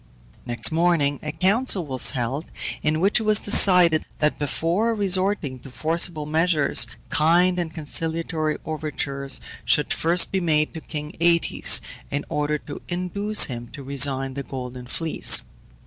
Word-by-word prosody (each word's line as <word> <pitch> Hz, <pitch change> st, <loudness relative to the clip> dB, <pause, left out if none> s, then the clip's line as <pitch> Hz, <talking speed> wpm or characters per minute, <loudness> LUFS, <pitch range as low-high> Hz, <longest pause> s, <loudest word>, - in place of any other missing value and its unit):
Next 120 Hz, +5 st, +2 dB
morning 160 Hz, -4 st, +1 dB
a 150 Hz, -, -5 dB
council 190 Hz, +3 st, 0 dB
was 130 Hz, -3 st, +2 dB
held, 135 Hz, +4 st, -3 dB, 0.4 s
in 155 Hz, +1 st, 0 dB
which 195 Hz, +6 st, +2 dB
it -, -, -4 dB
was 215 Hz, 0 st, +4 dB
decided, 180 Hz, -5 st, +5 dB
that 150 Hz, 0 st, -1 dB
before 170 Hz, +10 st, -1 dB
resorting 190 Hz, -8 st, 0 dB
to 130 Hz, -, -13 dB
forcible 160 Hz, +2 st, -1 dB
measures 155 Hz, -1 st, +1 dB, 0.2 s
kind 175 Hz, +4 st, +2 dB
and 170 Hz, -2 st, -4 dB
conciliatory 160 Hz, 0 st, -1 dB
overtures 140 Hz, -3 st, -4 dB, 0.2 s
should 150 Hz, -, +1 dB
first 170 Hz, +2 st, +1 dB
be 190 Hz, -, 0 dB
made 155 Hz, -3 st, 0 dB
to 160 Hz, -, -8 dB
king 150 Hz, -1 st, -7 dB
Aëtes 170 Hz, 0 st, +3 dB, 0.3 s
in 145 Hz, +1 st, -4 dB
order 150 Hz, 0 st, -1 dB
to 145 Hz, -1 st, -10 dB
induce 190 Hz, +4 st, +1 dB
him 120 Hz, -2 st, -3 dB
to 140 Hz, -, -9 dB
resign 135 Hz, -1 st, +1 dB
the 140 Hz, -, -5 dB
Golden 125 Hz, -2 st, -8 dB
Fleece. 160 Hz, +5 st, +3 dB
155 Hz, 145 wpm, -22 LUFS, 145-175 Hz, 0.4 s, decided